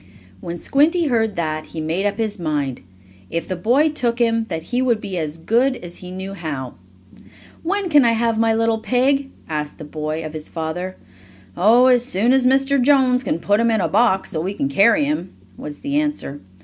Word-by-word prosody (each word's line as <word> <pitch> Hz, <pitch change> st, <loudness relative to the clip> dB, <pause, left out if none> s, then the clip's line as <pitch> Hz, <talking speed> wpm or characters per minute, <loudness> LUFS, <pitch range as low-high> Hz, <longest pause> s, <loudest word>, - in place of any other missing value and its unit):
When 170 Hz, -, -6 dB
Squinty 310 Hz, -, +2 dB
heard 225 Hz, -4 st, +1 dB
that, 155 Hz, -2 st, -3 dB
he 165 Hz, -, -7 dB
made 165 Hz, +6 st, -1 dB
up 205 Hz, -, -2 dB
his 215 Hz, -2 st, -2 dB
mind, 145 Hz, -6 st, -2 dB, 0.5 s
if 165 Hz, -1 st, -3 dB
the 185 Hz, -, -2 dB
boy 245 Hz, -, +2 dB
took 240 Hz, -6 st, -1 dB
him, 230 Hz, -2 st, +1 dB
that 160 Hz, 0 st, -4 dB
he 250 Hz, -, +2 dB
would 240 Hz, -4 st, +2 dB
be 195 Hz, -3 st, -6 dB
as 155 Hz, 0 st, -4 dB
good 240 Hz, +10 st, +1 dB
as 175 Hz, -6 st, -8 dB
he 180 Hz, -, -10 dB
knew 190 Hz, +1 st, -6 dB
how. 145 Hz, -9 st, -5 dB, 0.9 s
"When 390 Hz, +3 st, -1 dB
can 295 Hz, -5 st, +5 dB
I 235 Hz, -1 st, +3 dB
have 230 Hz, -1 st, 0 dB
my 225 Hz, 0 st, +3 dB
little 225 Hz, 0 st, +1 dB
pig?" 270 Hz, +4 st, +1 dB, 0.2 s
asked 150 Hz, -1 st, -4 dB
the -, -, -9 dB
boy, 155 Hz, +1 st, -4 dB
of 155 Hz, -, -7 dB
his 155 Hz, -1 st, -7 dB
father. 175 Hz, +3 st, -4 dB, 0.6 s
"Oh, 225 Hz, +8 st, +5 dB
as 250 Hz, -2 st, +4 dB
soon 240 Hz, +1 st, +1 dB
as 265 Hz, -1 st, +3 dB
Mr. 270 Hz, +1 st, +3 dB
Jones 260 Hz, -1 st, +3 dB
can 165 Hz, -, -1 dB
put 205 Hz, +5 st, +1 dB
him 230 Hz, 0 st, +3 dB
in 220 Hz, -1 st, +2 dB
a -, -, +1 dB
box, 220 Hz, -5 st, +2 dB
so 155 Hz, -, -2 dB
we 190 Hz, +4 st, -3 dB
can 140 Hz, -, -1 dB
carry 230 Hz, -, +4 dB
him," 285 Hz, -11 st, -3 dB, 0.2 s
was 145 Hz, +7 st, -9 dB
the 285 Hz, +1 st, -1 dB
answer. 295 Hz, -, -4 dB
220 Hz, 205 wpm, -20 LUFS, 165-255 Hz, 0.9 s, can